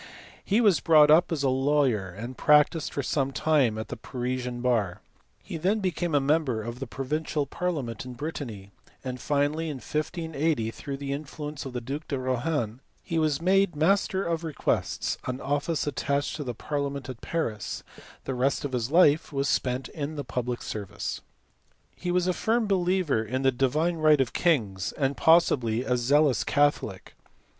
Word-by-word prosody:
He 210 +4 +2
was 205 -7 +4
brought 150 -2 +6
up 170 +3 +5
as 150 -4 -1
a 135 - +3
lawyer 130 -6 +2
and 115 +8 -7
practised 150 +3 +3
for 140 - -3
some 135 0 0
time 135 -7 +2
at 110 - -5
the - - -4
Parisian 125 -1 -4
bar; 115 -8 0 0.4
he - - -6
then 190 +7 +1
became 175 -4 -1
a - - +5
member 135 -5 +1
of 120 +2 -6
the 135 - -5
pro 135 +3 -5
vincial 150 0 -1
parliament 140 -9 -3
in 125 -1 -8
Brittany; 120 -10 -6 0.3
and 125 -1 -5
finally 150 +2 0
in 150 - -4
1580 155 -4 -2
through 140 +3 -6
the 140 0 -3
influence 150 0 -6
of 130 - -8
the 125 - -3
duke 140 +6 -5
de 140 - -2
Rohan 130 -2 -1 0.2
he 165 - -1
was 155 0 0
made 195 -1 +3
master 190 +4 +2
of 165 -2 -2
requests, 160 -3 -1
an 125 0 -3
office 145 +3 -1
attached 140 0 -1
to 150 - -4
the 125 -3 -4
parliament 140 0 -3
at 130 -2 -8
Paris; 115 -11 -3 0.4
the 135 - -3
rest 130 +3 0
of 140 - -3
his 125 -2 -1
life 160 -1 +4
was 140 -1 -1
spent 125 -1 0
in 155 0 -5
the 145 - -4
public 125 -2 -3
service. 105 -3 -5 0.7
He 180 - -5
was 180 0 +2
a 180 - +2
firm 225 +4 +1
believer 180 - +1
in 130 +5 -3
the 135 - +4
right 125 - -15
divine 155 +5 +1
of 130 -3 0
kings, 105 - +1
and 140 -1 0
probably 125 -9 +3
a 125 -1 +1
zealous 135 +1 +3
catholic. 145 0 0
140 Hz, 175 wpm, -27 LUFS, 125-160 Hz, 0.7 s, brought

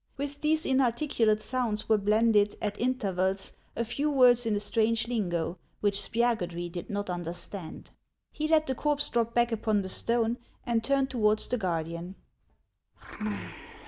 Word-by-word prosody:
With 285 +1 -5
these 310 +1 +2
inarticulate 240 -4 +2
sounds 230 -4 -1
were 220 -1 +4
blended, 210 0 +3
at 205 -1 -3
intervals, 195 -6 0 0.2
a 235 - -1
lew 300 +1 +2
words 245 -4 +5
in 215 - +1
a - - 0
strange 225 +2 +1
lingo, 175 -7 -2 0.2
which 205 -1 +2
Spiagudry 190 -6 0
did 175 0 -6
not 205 0 -3
understand. 175 0 -5 0.4
He 310 0 -2
let 310 -1 +4
the 265 - -1
corpse 290 +2 0
drop 235 -1 0
back 240 0 +3
upon 215 -2 +1
the 190 - -5
stone, 235 +3 +1 0.3
and 235 -2 +1
turned 275 +1 +1
towards 215 -3 +2
the 250 - -1
guardian. 170 0 -3
225 Hz, 145 wpm, -29 LUFS, 195-250 Hz, 0.4 s, words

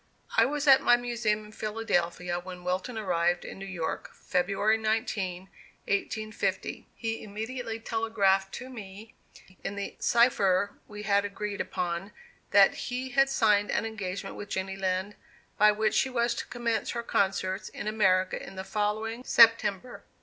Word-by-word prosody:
I 225 - +6
was 295 +3 -2
at 270 -2 +7
my 240 - +5
Museum 230 -3 -1
in 210 - -13
Philadelphia 180 -6 -1
when 180 0 -9
Wilton 185 +7 -2
arrived 175 -4 0
in - - -8
New 195 - -6
York, 170 -4 -4
February 195 +4 +1
19, 215 -5 -1
1850. 200 +1 -4
He 225 -1 -3
immediately 225 +2 -5
telegraphed 205 -4 +1
to 255 - -7
me, 215 -2 -10 0.5
in 200 - -4
the 200 0 -5
cipher 205 -5 +3
we 210 0 -8
had 200 -1 +3
agreed 205 0 -4
upon, 175 +3 -3 0.4
that - - +6 0.2
he 250 +1 -3
had 270 +2 +3
signed 210 -6 +3
an - - 0
engagement 200 -4 -5
with 205 - -8
Jenny 190 0 -3
Lind, 190 +1 -1 0.5
by 210 +1 +7
which 215 +1 0
she 265 - +2
was 235 -1 +1
to - - -5
commence 235 -2 -2
her 235 -1 -3
concerts 190 -2 0
in - - -7
America 190 -4 +2
in 195 - -10
the 190 - -5
following 215 +4 -2
September. 230 -1 +4
210 Hz, 150 wpm, -28 LUFS, 190-225 Hz, 0.5 s, at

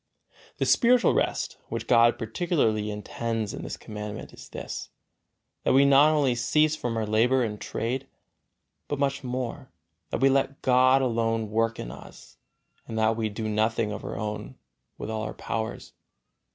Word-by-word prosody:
The - - 0
spiritual 245 0 +4
rest, - - -1
which 115 0 -4
God 120 0 +5
particularly 115 -4 0
intends 110 +1 -3
in - - -6
this - - -6
Commandment, 105 -1 -7
is - - -12
this: - - -6 0.7
that - - +2
we 135 +1 +6
not 140 +2 +6
only 145 -5 +2
cease 150 +6 +2
from 120 -6 -3
our 110 - 0
labor 120 +5 +3
and 105 -2 -4
trade, 125 +4 -3 0.8
but 145 - -2
much 140 0 0
more, 125 0 -4 0.4
that - - -2
we 135 - +6
let 135 0 +1
God 130 +1 +5
alone 115 -3 0
work 115 +1 +1
in - - -5
us - - -13 0.5
and 110 - -5
that 110 0 +3
we 110 -1 -1
do 110 +1 -4
nothing 110 0 +1
of 105 - -6
our - - -5
own 105 0 -5 0.4
with 110 - -5
all 110 -1 -2
our 110 - -5
powers. 110 0 -4
115 Hz, 165 wpm, -27 LUFS, 110-135 Hz, 0.8 s, we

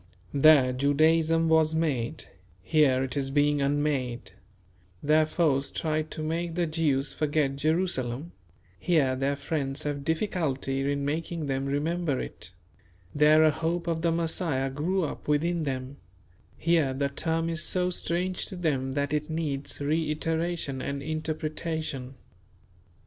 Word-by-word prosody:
There 140 -3 +6
Judaism 160 +4 +3
was 160 -1 +3
made, 150 -4 -1 0.4
here 135 -3 +3
it 130 -2 -4
is 135 -1 -1
being 145 +1 +2
unmade; 140 -4 -1 0.7
there 155 +1 +4
foes 145 -5 +1
tried 155 -1 -2
to 155 - -5
make 165 +1 -2
the 175 -1 +1
Jews 155 -4 0
forget 150 -2 0
Jerusalem, 155 -2 -1 0.5
here 145 - +2
their 135 +2 0
friends 140 0 -2
have 145 -1 -3
difficulty 140 -5 -1
in 140 0 -2
making 160 +2 -2
them 135 0 -2
remember 150 +1 -1
it; - - -7 0.6
there 150 +1 +5
a 155 - +5
hope 170 +3 -2
of 165 -2 -1
the 170 0 +2
Messiah 165 -5 -1
grew 175 +7 0
up 150 - -5
within 160 +2 +1
them, 130 0 -4 0.6
here 160 -6 +2
the 140 +1 0
term 165 +3 -1
is 165 0 -1
so 180 0 0
strange 180 +1 -2
to 195 - -6
them 135 -7 -1
that 145 +1 -1
it 150 +1 -1
needs 150 -4 -3
reiteration 155 -1 -1
and 140 +1 -4
interpretation. 155 -3 -3
150 Hz, 135 wpm, -27 LUFS, 140-165 Hz, 0.7 s, There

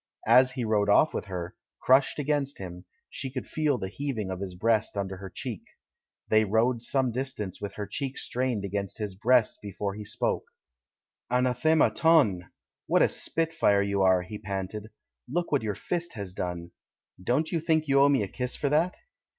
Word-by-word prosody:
As 130 +1 +6
he 125 -3 -2
rode 105 -2 +1
off 155 +9 +5
with - - -3
her, 90 0 -5 0.3
crushed 130 +2 +4
against 145 -1 -1
him, 90 -2 -8 0.2
she 135 - -5
could 130 -1 -5
feel 150 -4 0
the 95 - -4
heaving 110 -3 -4
of 95 - -4
his 95 -2 -5
breast 110 +2 +1
under 95 -1 -3
her 95 0 -8
cheek. 90 - -5 0.7
They 110 0 +4
rode 115 +3 +1
some 130 +1 0
distance 120 -7 -4
with 100 -1 -5
her 105 - -4
cheek 135 +6 -4
strained 125 -5 -2
against 100 0 -4
his 105 -3 -4
breast 115 +3 +2
before 100 0 -4
he 105 +1 -7
spoke. - - -1 0.8
THE 125 - 0
CHILD - - +6
IN 125 - +2
THE 130 - +3
GARDEN 140 +6 +1 0.4
171 140 - +5
''Anathema - - -11
ton! 90 - -20 0.4
What - - +3
a - - +4
spitfire 160 -12 +1
you 100 -1 0
are!" 95 -1 +4
he 105 +3 -8
panted. 100 +1 -5 0.4
"Look 175 +6 -2
what 145 - +2
your 105 -2 -2
fist 170 - -3
has 100 -4 -6
done! 90 -2 -4 0.5
Don't 145 +9 +1
you 170 - +1
think 160 -1 +1
you 140 0 +4
owe 140 - +6
me 135 -6 +3
a - - -3
kiss 125 +5 -2
for 140 - -1
that?" 160 +5 +2
110 Hz, 200 wpm, -28 LUFS, 100-135 Hz, 0.8 s, As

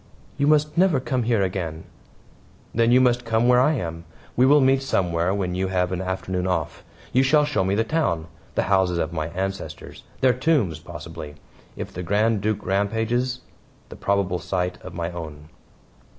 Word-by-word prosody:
"You 140 - +1
must 150 0 +3
never 180 -7 +4
come 130 0 -1
here 110 -4 +3
again." 85 -4 -3 0.9
"Then 115 +1 +3
you 125 - +6
must 125 -1 +3
come 115 0 +1
where 125 0 +6
I 145 +5 +4
am. 85 - -4 0.3
We 125 +2 +4
will 145 +2 +6
meet 135 0 +4
somewhere 90 -8 0
when 95 -3 -1
you 95 +1 -1
have 90 -1 0
an 90 0 -2
afternoon 95 -1 -2
off. 85 -5 -2 0.3
You 130 - +5
shall 150 +3 +4
show 145 -9 0
me 95 +1 +1
the 110 - +2
town 110 - 0 0.3
the - - +2
houses 95 -3 +2
of 80 0 -2
my 80 -2 -2
ancestors 95 -2 -5 0.2
their 130 -1 +5
tombs; 125 - +1
possibly 75 -1 -9 0.4
if - - -6
the 90 - -5
Grand 105 +4 +1
Duke 105 0 -1
rampages 115 +6 0 0.5
the - - -9
probable 100 -3 0
site 90 +1 -2
of 95 - -9
my 85 0 -3
own." 80 -3 -8
95 Hz, 180 wpm, -23 LUFS, 90-125 Hz, 0.9 s, you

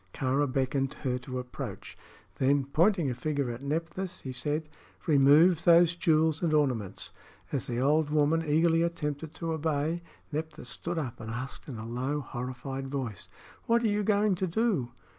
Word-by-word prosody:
Kāra 135 +1 +1
beckoned 135 0 0
her 125 -2 0
to 130 0 -6
approach. 125 0 -6 0.4
Then, 135 +1 +2
pointing 165 +1 +2
a - - -1
finger 140 0 -1
at 120 +2 -7
Nephthys, 165 +5 -3
he 130 - -5
said: 145 +5 -2 0.4
"Remove 155 +3 +5
those 170 0 +6
jewels 160 -2 +2
and 165 -3 +2
ornaments." 125 -10 0 0.4
As 140 - -2
the 120 -1 -2
old 150 +3 +3
woman 155 +2 +2
eagerly 165 +2 +3
attempted 160 -2 -2
to 165 -1 -3
obey, 160 +1 -1 0.3
Nephthys 155 -3 -5
stood 170 +6 -3
up 130 -7 -3
and 110 -1 -7
asked 125 +5 -6
in 125 - -6
a 110 - -6
low, 130 +5 -2
horrified 130 +1 -5
voice: 130 -8 -4 0.4
"What 235 +1 +3
are - - +3
you 205 0 +1
going 205 0 +3
to 185 - 0
do?" 180 - +1
145 Hz, 165 wpm, -29 LUFS, 130-165 Hz, 0.4 s, those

